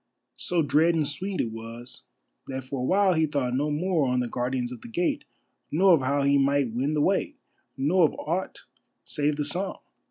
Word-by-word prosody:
So 175 Hz, -2 st, +1 dB
dread 155 Hz, +4 st, +3 dB
and 155 Hz, -3 st, +1 dB
sweet 185 Hz, +6 st, -3 dB
it 115 Hz, -, 0 dB
was 115 Hz, +2 st, -8 dB, 0.4 s
that 130 Hz, -1 st, -4 dB
for 130 Hz, +1 st, -5 dB
a -, -, -2 dB
while 190 Hz, +6 st, +3 dB
he 160 Hz, -1 st, +2 dB
thought 140 Hz, -4 st, -1 dB
no 145 Hz, +3 st, 0 dB
more 155 Hz, -1 st, +1 dB
on 125 Hz, 0 st, +1 dB
the 125 Hz, -, -1 dB
Guardians 125 Hz, 0 st, -2 dB
of 125 Hz, -, -8 dB
the -, -, -10 dB
Gate, 175 Hz, +10 st, -1 dB, 0.4 s
nor 185 Hz, +4 st, +5 dB
of 160 Hz, -, +4 dB
how 140 Hz, +2 st, +1 dB
he 140 Hz, 0 st, +4 dB
might 140 Hz, -2 st, +2 dB
win 135 Hz, +6 st, 0 dB
the 150 Hz, -, +2 dB
way, -, -, +1 dB, 0.4 s
nor 160 Hz, +6 st, +4 dB
of -, -, -1 dB
aught 175 Hz, +5 st, -3 dB, 0.4 s
save 145 Hz, 0 st, -1 dB
the 150 Hz, 0 st, -2 dB
song. 180 Hz, +6 st, -2 dB
145 Hz, 200 wpm, -26 LUFS, 130-165 Hz, 0.4 s, nor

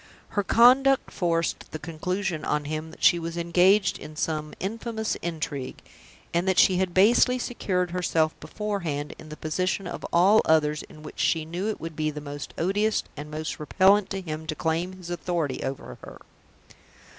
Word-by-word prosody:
Her 205 Hz, -, 0 dB
conduct 260 Hz, +6 st, +5 dB
forced 170 Hz, -2 st, -1 dB
the -, -, -2 dB
conclusion 165 Hz, +2 st, -3 dB
on 150 Hz, 0 st, -1 dB
him 155 Hz, +2 st, -4 dB
that 160 Hz, -, -14 dB
she 175 Hz, -2 st, +6 dB
was 165 Hz, 0 st, -5 dB
engaged 185 Hz, +3 st, +3 dB
in 155 Hz, -, -10 dB
some 155 Hz, -1 st, -3 dB
infamous 220 Hz, +2 st, -3 dB
intrigue; 155 Hz, -5 st, -4 dB, 0.5 s
and 170 Hz, +2 st, +1 dB
that 190 Hz, -1 st, +2 dB
she 185 Hz, -, +5 dB
had 185 Hz, -1 st, 0 dB
basely 235 Hz, +6 st, +5 dB
secured 185 Hz, -8 st, -2 dB
herself 165 Hz, -3 st, +1 dB
beforehand 175 Hz, -9 st, -3 dB
in 155 Hz, -, -11 dB
the 155 Hz, -, -8 dB
position 185 Hz, +5 st, -1 dB
of 175 Hz, -, -6 dB
all 195 Hz, +6 st, +5 dB
others 150 Hz, -1 st, +2 dB
in 155 Hz, -, -14 dB
which 150 Hz, -, -10 dB
she 160 Hz, -2 st, +1 dB
knew 175 Hz, +5 st, -3 dB
it 215 Hz, -, -3 dB
would 165 Hz, -1 st, -7 dB
be 155 Hz, 0 st, -1 dB
most 145 Hz, -1 st, -7 dB
odious 205 Hz, +5 st, +1 dB
and 150 Hz, +1 st, -7 dB
most 155 Hz, +1 st, -4 dB
repellent 190 Hz, +6 st, +3 dB
to 195 Hz, -1 st, -3 dB
him 160 Hz, -2 st, -6 dB
to 155 Hz, -, -2 dB
claim 165 Hz, +4 st, -1 dB
his 180 Hz, -2 st, -9 dB
authority 170 Hz, -5 st, -2 dB
over 135 Hz, -, -6 dB
her. -, -, -10 dB
170 Hz, 170 wpm, -26 LUFS, 155-190 Hz, 0.5 s, she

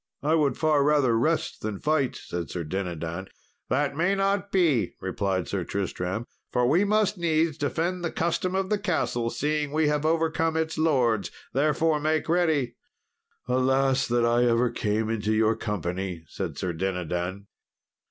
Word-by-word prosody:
"I 155 Hz, +2 st, +2 dB
would 150 Hz, -5 st, +2 dB
far 155 Hz, -3 st, +3 dB
rather 145 Hz, -5 st, +3 dB
rest 155 Hz, +8 st, 0 dB
than 105 Hz, -2 st, -4 dB
fight," 150 Hz, -4 st, +1 dB
said 85 Hz, -1 st, -5 dB
Sir 90 Hz, -, -4 dB
Dinadan. 85 Hz, +1 st, -4 dB, 0.4 s
"That 140 Hz, +2 st, +1 dB
may 175 Hz, +6 st, +2 dB
not 195 Hz, 0 st, 0 dB
be," 150 Hz, -, +2 dB
replied 95 Hz, -3 st, -1 dB
Sir 95 Hz, -3 st, -2 dB
Tristram, 95 Hz, +3 st, -3 dB, 0.3 s
"for 125 Hz, -, +2 dB
we 165 Hz, +9 st, +4 dB
must 205 Hz, -2 st, +1 dB
needs 160 Hz, -2 st, +1 dB
defend 165 Hz, +5 st, -2 dB
the 170 Hz, -, -1 dB
custom 170 Hz, +2 st, -1 dB
of 190 Hz, +1 st, -1 dB
the 210 Hz, -, +2 dB
castle, 160 Hz, -, 0 dB
seeing 150 Hz, +2 st, -1 dB
we 155 Hz, 0 st, +2 dB
have 150 Hz, 0 st, 0 dB
overcome 160 Hz, 0 st, +1 dB
its 160 Hz, -1 st, -1 dB
lords; 125 Hz, -10 st, +2 dB, 0.2 s
therefore, 155 Hz, +3 st, +2 dB
make 155 Hz, +1 st, 0 dB
ready." 160 Hz, -8 st, +1 dB, 0.7 s
"Alas 130 Hz, +1 st, +2 dB
that 120 Hz, 0 st, +2 dB
I 120 Hz, +1 st, +3 dB
ever 120 Hz, 0 st, +2 dB
came 110 Hz, +1 st, -1 dB
into 110 Hz, -1 st, -1 dB
your 110 Hz, +1 st, +3 dB
company," 95 Hz, -5 st, -3 dB
said -, -, -5 dB
Sir 90 Hz, -2 st, -2 dB
Dinadan. 90 Hz, +2 st, -3 dB
135 Hz, 155 wpm, -26 LUFS, 105-160 Hz, 0.7 s, we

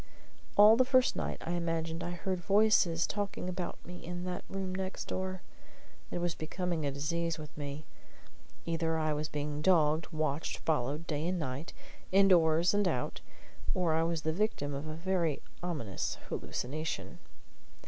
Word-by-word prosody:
All 210 Hz, +2 st, +9 dB
the 255 Hz, -, +6 dB
first 255 Hz, 0 st, +4 dB
night -, -, -2 dB
I 170 Hz, -, -2 dB
imagined 165 Hz, -1 st, -1 dB
I -, -, -3 dB
heard 180 Hz, +1 st, -2 dB
voices 195 Hz, -4 st, +4 dB
talking 200 Hz, -3 st, -3 dB
about 180 Hz, -1 st, -3 dB
me 180 Hz, 0 st, -9 dB
in 175 Hz, +1 st, -5 dB
that 180 Hz, 0 st, -3 dB
room 190 Hz, -1 st, -3 dB
next 190 Hz, 0 st, -3 dB
door. 185 Hz, 0 st, -3 dB, 0.7 s
It -, -, -3 dB
was 175 Hz, -1 st, 0 dB
becoming 170 Hz, +1 st, -2 dB
a -, -, 0 dB
disease 165 Hz, +4 st, -1 dB
with 150 Hz, -2 st, -9 dB
me. 145 Hz, 0 st, -5 dB, 0.8 s
Either 165 Hz, -1 st, 0 dB
I 155 Hz, -1 st, +1 dB
was 150 Hz, 0 st, -2 dB
being 150 Hz, 0 st, -3 dB
dogged, 155 Hz, -2 st, +4 dB
watched, 155 Hz, -1 st, -1 dB
followed, 150 Hz, +1 st, 0 dB
day 155 Hz, +1 st, -1 dB
and 185 Hz, +1 st, 0 dB
night, 140 Hz, -1 st, -4 dB, 0.4 s
indoors 175 Hz, -3 st, +5 dB
and 205 Hz, -1 st, +3 dB
out, 125 Hz, -8 st, -1 dB, 0.5 s
or 175 Hz, -3 st, +2 dB
I 160 Hz, -, +3 dB
was 165 Hz, -1 st, 0 dB
the 160 Hz, -, +1 dB
victim 170 Hz, -7 st, 0 dB
of 140 Hz, +3 st, -4 dB
a 155 Hz, -, -4 dB
very 170 Hz, -3 st, 0 dB, 0.2 s
ominous 145 Hz, -, -3 dB
hallucination. 155 Hz, +5 st, -4 dB
165 Hz, 160 wpm, -32 LUFS, 155-185 Hz, 0.8 s, All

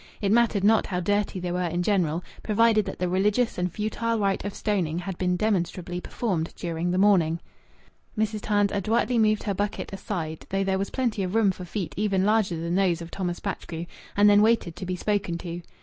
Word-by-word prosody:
It 200 Hz, -1 st, 0 dB
mattered 230 Hz, -3 st, +3 dB
not 220 Hz, +2 st, +4 dB
how 180 Hz, -2 st, -2 dB
dirty 205 Hz, +1 st, 0 dB
they 180 Hz, -1 st, -3 dB
were 180 Hz, +1 st, -1 dB
in 175 Hz, 0 st, -1 dB
general, 175 Hz, -4 st, +1 dB, 0.2 s
provided 220 Hz, -1 st, +3 dB
that 190 Hz, -, -5 dB
the 180 Hz, -, -1 dB
religious 205 Hz, +5 st, +1 dB
and 180 Hz, 0 st, 0 dB
futile 225 Hz, +3 st, -1 dB
rite 200 Hz, -2 st, 0 dB
of 200 Hz, 0 st, -5 dB
stoning 180 Hz, -7 st, -1 dB
had 180 Hz, +1 st, -4 dB
been 180 Hz, -1 st, +1 dB
demonstrably 180 Hz, -3 st, -1 dB
performed 180 Hz, -9 st, -2 dB
during 170 Hz, 0 st, -2 dB
the 180 Hz, -, 0 dB
morning. 180 Hz, -5 st, +4 dB, 0.8 s
Mrs. 215 Hz, 0 st, 0 dB
Tams 205 Hz, -1 st, +2 dB
adroitly 225 Hz, +4 st, +1 dB
moved 215 Hz, -1 st, +3 dB
her 205 Hz, -, -1 dB
bucket, 205 Hz, 0 st, -3 dB
aside, 170 Hz, -5 st, -5 dB
though 195 Hz, 0 st, 0 dB
there 190 Hz, 0 st, 0 dB
was 195 Hz, -, -2 dB
plenty 240 Hz, -6 st, -1 dB
of 185 Hz, +2 st, -2 dB
room 220 Hz, -3 st, +4 dB
for 185 Hz, -1 st, -8 dB
feet 180 Hz, -1 st, -4 dB
even 195 Hz, -2 st, +1 dB
larger 210 Hz, -5 st, +2 dB
than 170 Hz, +1 st, -3 dB
those 180 Hz, -3 st, +2 dB
of 165 Hz, -, -10 dB
Thomas 180 Hz, -3 st, -3 dB
Batchgrew, 165 Hz, 0 st, -5 dB, 0.3 s
and 205 Hz, 0 st, +6 dB
then 205 Hz, 0 st, +6 dB
waited 215 Hz, -6 st, +2 dB
to 185 Hz, -, -6 dB
be 185 Hz, -, -1 dB
spoken 205 Hz, -2 st, -1 dB
to. 170 Hz, 0 st, -6 dB
195 Hz, 205 wpm, -26 LUFS, 175-210 Hz, 0.8 s, and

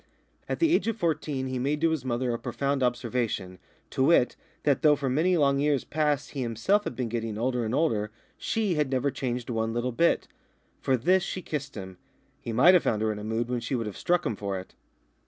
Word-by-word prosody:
At -, -, -1 dB
the 330 Hz, -1 st, +3 dB
age -, -, +2 dB
of 225 Hz, -1 st, -1 dB
fourteen 155 Hz, -7 st, -1 dB
he 130 Hz, -1 st, -3 dB
made 145 Hz, +4 st, 0 dB
to 165 Hz, 0 st, +3 dB
his 160 Hz, -5 st, -1 dB
mother 125 Hz, -1 st, -1 dB
a 115 Hz, -, -3 dB
profound 135 Hz, +3 st, -1 dB
observation, 120 Hz, -7 st, -1 dB, 0.3 s
to 130 Hz, -, +1 dB
wit, 140 Hz, -5 st, +4 dB, 0.3 s
that 140 Hz, -3 st, +2 dB
though 150 Hz, -1 st, +6 dB
for 135 Hz, -2 st, -2 dB
many 170 Hz, +7 st, +2 dB
long 140 Hz, -2 st, +3 dB
years 145 Hz, -2 st, +1 dB
past 150 Hz, -2 st, -1 dB
he 140 Hz, -, -4 dB
himself 125 Hz, -, +1 dB
had -, -, -4 dB
been 125 Hz, -1 st, -2 dB
getting 115 Hz, -2 st, -3 dB
older 125 Hz, +1 st, 0 dB
and 110 Hz, +3 st, -1 dB
older, 110 Hz, -10 st, +1 dB, 0.3 s
she 215 Hz, -5 st, -1 dB
had 150 Hz, -4 st, 0 dB
never 135 Hz, +1 st, 0 dB
changed 125 Hz, -2 st, -3 dB
one 115 Hz, -1 st, -1 dB
little 120 Hz, +2 st, -1 dB
bit. 170 Hz, +8 st, +2 dB, 0.5 s
For 130 Hz, -, +1 dB
this 185 Hz, +10 st, +3 dB
she 185 Hz, 0 st, -4 dB
kissed 145 Hz, -2 st, -4 dB
him; 95 Hz, -3 st, -8 dB, 0.4 s
he 115 Hz, -, -5 dB
might 130 Hz, +11 st, +6 dB
have 180 Hz, -, +6 dB
found 110 Hz, -1 st, 0 dB
her 110 Hz, -, +1 dB
in 105 Hz, -, -5 dB
a -, -, -7 dB
mood 110 Hz, +2 st, -1 dB
when 125 Hz, 0 st, -1 dB
she 120 Hz, +3 st, -3 dB
would 115 Hz, -2 st, -2 dB
have 105 Hz, -3 st, -5 dB
struck 175 Hz, 0 st, +1 dB
him 115 Hz, -, -1 dB
for 100 Hz, -1 st, -3 dB
it. 95 Hz, -, -12 dB
130 Hz, 230 wpm, -27 LUFS, 115-150 Hz, 0.5 s, though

